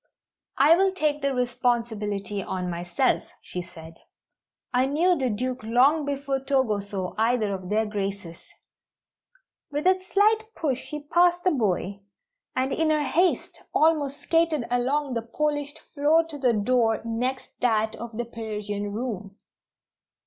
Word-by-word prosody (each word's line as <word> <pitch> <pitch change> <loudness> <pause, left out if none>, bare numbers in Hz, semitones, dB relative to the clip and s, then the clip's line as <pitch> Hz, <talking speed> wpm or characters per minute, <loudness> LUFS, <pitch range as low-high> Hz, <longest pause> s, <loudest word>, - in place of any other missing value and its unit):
"I 295 +4 +7
will 385 +2 +3
take 300 -5 0
the 280 0 +1
responsibility 220 -5 -1
on 180 -1 -3
myself," 175 +8 0
she 180 - -5
said. 165 -2 -12 0.8
"I 255 +1 +3
knew 340 +6 +3
the 265 -5 0
Duke 255 +4 -2
long 260 +7 +3
before 280 -1 -2
Togo 265 -6 +1
saw 195 -2 -5
either 225 -2 +2
of 185 -1 -6
Their 220 +1 +2
Graces." 200 -5 -4 1.3
With 295 +2 -3
a 370 0 +3
slight 440 +2 +2
push 270 -5 -1
she 300 0 -6
passed 350 +3 +3
the 370 - +3
boy, 200 - -1 0.6
and 260 +1 0
in 320 -1 +1
her 305 -1 +2
haste 345 +6 +1
almost 295 -3 +3
skated 325 -6 +1
along 265 +3 0
the 230 - -1
polished 290 +4 -2 0.2
floor 310 +3 +4
to 295 -2 -7
the 250 -3 +3
door 225 +1 +2
next 250 +3 -2
that 220 -3 +1
of 235 -1 -7
the 240 - -2
Persian 210 -3 -4
room. 210 -4 -5
250 Hz, 140 wpm, -26 LUFS, 210-295 Hz, 1.3 s, I